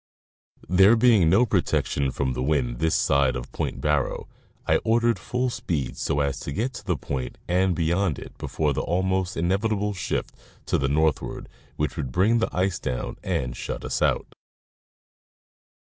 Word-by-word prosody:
There 95 +5 +6
being 110 -8 +5
no 100 +9 +5
protection 70 - 0
from 65 0 -1
the 65 - -3
wind 65 -4 0
this 80 0 +2
side 70 -2 +2
of - - -6
Point - - -3
Barrow, 75 -4 0 0.4
I - - +3
ordered 115 +1 +2
full 125 0 -1
speed 75 - -3
so 75 - -1
as 70 -1 -1
to - - -5
get 120 - -2
to 120 - -8
the 90 -6 -1
point 65 -3 -4
and 90 +1 +2
beyond 85 -1 +1
it - - -10
before 75 -2 -1
the - - -1
almost 95 +1 0
inevitable 100 +4 0
shift 90 - -3 0.3
to - - +1
the 70 0 0
northward 75 -1 0 0.3
which 75 +2 -2
would 70 -6 -3
bring 105 - +3
the 115 - 0
ice 95 0 0
down 65 -2 -4
and - - -2
shut - - -5
us - - -2
out. - - +1
85 Hz, 165 wpm, -25 LUFS, 70-100 Hz, 0.4 s, There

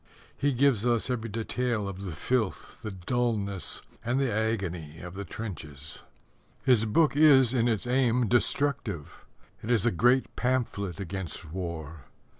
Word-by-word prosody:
He 145 - +1
gives 130 -4 +3
us 120 +1 +1
every 115 -2 -2
detail 115 0 -1
of 100 0 -6
the 90 - -4
filth, 110 +5 -2
the 110 - -4
dullness, 100 -2 -1 0.2
and 120 +3 0
the 135 -5 +1
agony 95 -8 -2
of 90 +1 -8
the 100 +1 -6
trenches. 80 -8 -7 0.6
His 125 -4 +4
book 145 +7 +3
is 135 -5 +6
in 120 -2 +2
its 115 -2 0
aim 125 -1 +2
destructive. 120 - 0 0.3
It 110 - -7
is 115 -4 +2
a 120 - +4
great 125 +8 +2
pamphlet 115 -8 -1
against 95 -4 -5
war. 85 -5 -6
110 Hz, 145 wpm, -28 LUFS, 95-125 Hz, 0.6 s, is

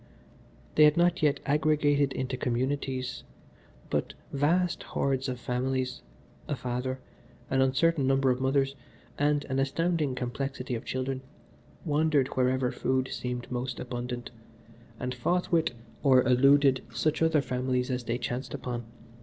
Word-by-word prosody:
They 155 - +7
had 150 +1 +4
not 175 +1 +3
yet 145 -2 +3
aggregated 145 -1 +2
into 130 0 -2
communities, 130 0 -2 0.7
but - - -1 0.2
vast 170 +6 +2
hordes 135 -1 -1
of 125 -1 -4
families 130 +1 -2 0.5
a 145 - -1
father, 125 +1 -3 0.5
an 135 0 +3
uncertain 140 +2 +2
number 135 -1 +3
of 125 +1 -1
mothers, 135 +1 +2 0.5
and 145 0 +2
an 135 -1 -1
astounding 150 0 0
complexity 125 +1 -3
of 115 - -4
children 130 0 -2 0.6
wandered 150 -3 +2
wherever 130 0 +1
food 130 0 0
seemed 125 0 -4
most 125 0 -3
abundant, 120 -1 -5 0.7
and 125 0 -2
fought 175 +10 0
with 170 -1 +3 0.3
or 130 -3 +5
eluded 135 +1 +5
such 155 +8 0
other 160 -1 +4
families 125 0 -1
as 125 -1 -2
they 115 +1 -1
chanced 125 +1 -4
upon. 120 -2 -4
130 Hz, 135 wpm, -29 LUFS, 125-145 Hz, 0.7 s, They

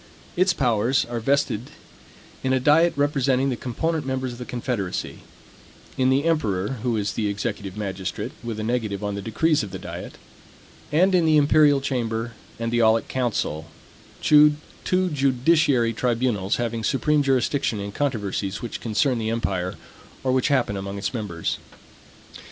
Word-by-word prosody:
Its 185 +1 +3
powers 125 - +1
are 120 0 -4
vested 135 -2 0 0.7
in 130 0 +1
a 130 - +3
diet 155 +6 +4
representing 135 -2 +1
the - - -1
component 155 +7 -2
members 130 -1 -2
of 120 - -11
the 125 - -6
confederacy; 120 -7 -3 0.8
in 130 0 +2
the 135 +2 +3
emperor, 110 - 0
who 120 -2 0
is 100 -1 -1
the 110 - -1
executive 100 -1 -4
magistrate, 95 -3 -4
with 115 -2 -4
a - - -3
negative 110 -4 -2
on 105 0 -2
the 100 - -4
decrees 150 +9 +1
of 105 - -5
the 95 - -6
diet; - - -8 0.7
and 185 +6 +3
in 180 -2 +4
the 155 -1 +5
imperial 145 -1 +5
chamber 115 -4 -2 0.3
and 115 0 -3
the 120 - +3
aulic 110 0 +3
council, 105 -11 -2 0.6
two 150 0 +6 0.6
judiciary 135 -2 +3
tribunals 115 -5 0
having 115 -1 -2
supreme 150 +4 +2
jurisdiction 135 -4 +1
in 100 0 -5
controversies 105 -6 -2
which 120 - -6
concern 120 +3 +1
the 110 0 -2
empire, 95 -6 -2 0.5
or 130 - +1
which 130 -1 +2
happen 130 -8 +1
among 100 +1 -5
its 100 - -3
members. 100 -8 -3
120 Hz, 155 wpm, -24 LUFS, 105-140 Hz, 0.8 s, two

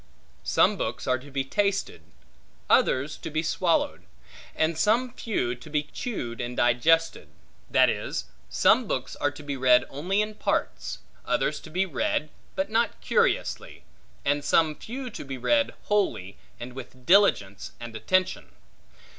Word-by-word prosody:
Some - - +3
books - - -3
are 130 0 +1
to 140 +3 -13
be 135 -1 -1
tasted, 200 - -1 0.7
others 140 +4 +3
to - - -7
be 155 +1 -1
swallowed, 170 0 +1 0.5
and 160 +1 +1
some 230 +8 +2
few 125 - -1
to 125 +5 -12
be 150 0 0
chewed 130 - -5
and 120 0 -5
digested; 155 - +2 0.4
that - - +5
is, - - -2 0.2
some - - +4
books - - -3
are - - +1
to - - -11
be 145 -1 -4
read 125 -1 +4
only 180 +9 -1
in 215 0 -6
parts; - - -2 0.2
others - - 0
to 160 - -12
be 185 +4 0
read, 150 -2 -1 0.2
but 285 -5 -2
not 230 +1 +1
curiously; 470 0 0 0.4
and 145 +1 +1
some 155 +1 +3
few 250 - -7
to - - -7
be 135 -2 -6
read 285 - +1
wholly, 190 - 0 0.2
and 125 +1 -7
with 130 -1 -11
diligence 170 - +3
and 120 -1 -8
attention. 185 +12 0
155 Hz, 150 wpm, -26 LUFS, 125-200 Hz, 0.7 s, that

